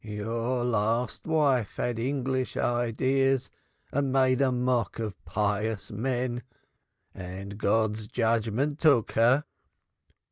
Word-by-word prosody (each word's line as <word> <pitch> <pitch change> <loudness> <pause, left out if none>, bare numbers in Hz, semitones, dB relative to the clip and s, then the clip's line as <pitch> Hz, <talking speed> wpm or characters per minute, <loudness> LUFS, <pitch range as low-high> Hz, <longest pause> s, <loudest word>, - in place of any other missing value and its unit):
Your 115 +4 -2
last 115 +3 0
wife 140 -9 +2
had 120 -2 -2
English 130 0 -1
ideas 130 +3 +1 0.4
and 140 -1 0
made 130 -1 +3
mock 125 -2 +1
of 110 -3 -5
pious 105 +3 -1
men 120 +2 -2 0.7
and 95 +2 -7
God's 110 0 +1
judgment 115 +6 0
took 140 -9 +4
her. 120 +6 +4
120 Hz, 100 wpm, -28 LUFS, 110-130 Hz, 0.7 s, took